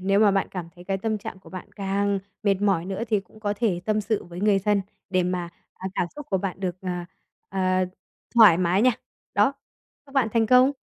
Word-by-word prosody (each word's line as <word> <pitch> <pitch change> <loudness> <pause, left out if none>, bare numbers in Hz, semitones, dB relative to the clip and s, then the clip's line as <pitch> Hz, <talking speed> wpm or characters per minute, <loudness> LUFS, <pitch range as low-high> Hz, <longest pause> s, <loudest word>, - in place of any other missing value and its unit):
nếu 195 +2 +3
mà 210 -2 +6
bạn 195 0 +1
cảm 180 -3 -5
thấy 175 - -13
cái 195 +1 -1
tâm 220 +1 -1
trạng 215 -2 -7
của 190 - -16
bạn 185 -1 -8
càng 200 0 0 0.2
mệt 200 -2 +3
mỏi 195 -5 +2
nữa 195 +3 -3
thì 210 -2 +2
cũng 200 +3 -19
có 205 -1 -1
thể 200 -6 0
tâm 215 0 +1
sự 215 0 -1
với 175 +1 -8
người 205 -1 +4
thân 200 0 +1 0.3
để 185 -1 +3
mà, 180 -1 -2 0.3
ờ, 190 - -5
cảm - - +1
xúc 295 -1 -7
của 190 - +2
bạn 195 0 -4
được, 180 -2 -2
ờ, 190 - -5 0.6
ờ, 190 0 -3 0.7
thoải 215 -8 +8
mái 185 +3 +2
nha. 255 - +6 0.4
Đó, 205 +6 +4 0.5
chúc 275 - -17
bạn 265 -5 +3
thành 230 -1 +3
công. 255 +3 +6
200 Hz, 225 wpm, -25 LUFS, 185-215 Hz, 0.7 s, thoải